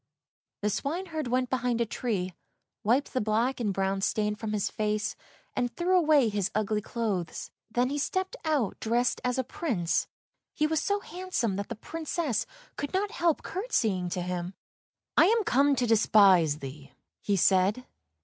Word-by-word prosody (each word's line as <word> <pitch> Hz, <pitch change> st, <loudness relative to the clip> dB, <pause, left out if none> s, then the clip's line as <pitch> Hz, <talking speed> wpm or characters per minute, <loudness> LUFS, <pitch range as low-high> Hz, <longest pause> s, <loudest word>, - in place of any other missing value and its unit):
" -, -, -66 dB
The 210 Hz, -, +2 dB
swineherd 315 Hz, -, -3 dB
went 250 Hz, +1 st, 0 dB
behind 250 Hz, -2 st, 0 dB
a 235 Hz, -, +2 dB
tree, 200 Hz, -5 st, -2 dB, 0.5 s
wiped 250 Hz, +7 st, +2 dB
the 255 Hz, -, +1 dB
black 225 Hz, +5 st, +1 dB
and 215 Hz, -4 st, 0 dB
brown 195 Hz, 0 st, -1 dB
stain 210 Hz, +1 st, +1 dB
from 210 Hz, +1 st, -5 dB
his 210 Hz, -2 st, 0 dB
face, 215 Hz, 0 st, -1 dB, 0.4 s
and 245 Hz, -1 st, 0 dB
threw 360 Hz, +2 st, +2 dB
away 305 Hz, -7 st, +5 dB
his 205 Hz, -3 st, 0 dB
ugly 215 Hz, 0 st, 0 dB
clothes. 205 Hz, -7 st, -3 dB, 0.2 s
Then 245 Hz, +3 st, +1 dB
he 290 Hz, -, -1 dB
stepped 375 Hz, -, -1 dB
out 295 Hz, -, 0 dB
dressed 240 Hz, +2 st, +1 dB
as 250 Hz, +1 st, 0 dB
a 260 Hz, -, +1 dB
Prince, 230 Hz, -, -1 dB, 0.5 s
he 300 Hz, -, +2 dB
was 315 Hz, 0 st, +1 dB
so 405 Hz, 0 st, 0 dB
handsome 355 Hz, -, -2 dB
that 200 Hz, -, -4 dB
the -, -, -4 dB
Princess 310 Hz, -, -2 dB, 0.3 s
could 285 Hz, +5 st, -3 dB
not 400 Hz, +2 st, 0 dB
help 340 Hz, -8 st, +1 dB
curtseying 220 Hz, -, -1 dB
to 180 Hz, -, -2 dB
him. 180 Hz, +1 st, -4 dB, 0.3 s
" -, -, -59 dB
I -, -, +8 dB
am 450 Hz, +1 st, +3 dB
come 280 Hz, -3 st, +3 dB
to 250 Hz, -1 st, +1 dB
despise 200 Hz, -8 st, +5 dB
thee," 140 Hz, -1 st, -9 dB, 0.3 s
he 205 Hz, -, +1 dB
said. 195 Hz, +6 st, +3 dB
235 Hz, 170 wpm, -28 LUFS, 200-295 Hz, 0.5 s, I